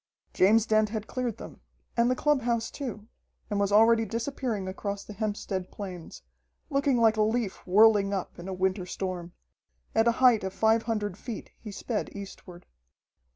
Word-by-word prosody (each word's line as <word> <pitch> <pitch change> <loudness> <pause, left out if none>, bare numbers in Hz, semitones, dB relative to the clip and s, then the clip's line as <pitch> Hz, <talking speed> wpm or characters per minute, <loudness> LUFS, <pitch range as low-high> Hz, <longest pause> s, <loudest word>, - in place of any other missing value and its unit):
James 215 +4 +4
Dent 215 -1 +3
had 215 -1 -4
cleared 245 -2 -3
them, - - -11 0.3
and 235 +1 +3
the 255 - +2
clubhouse 245 -6 +1
too, 225 -7 -6 0.4
and 205 - 0
was 200 0 +1
already 225 +2 +5
disappearing 230 -3 -3
across 200 +1 -4
the 210 - -10
Hempstead 205 -3 -3
Plains, 180 - -8 0.5
looking 275 -2 +2
like 225 -1 +4
a - - +3
leaf 220 -2 0
whirling 205 +1 +5
up 190 -3 -4
in 175 - -8
a - - -4
winter 185 0 -1
storm. 180 -2 -5 0.6
At 225 +1 +3
a 235 - +4
height 245 -4 +4
of 190 0 -3
five 220 +3 +3
hundred 205 -4 -2
feet 230 -4 -7
he 215 - -8
sped 215 +2 -3
eastward. 190 -3 -10
215 Hz, 165 wpm, -28 LUFS, 195-230 Hz, 0.6 s, already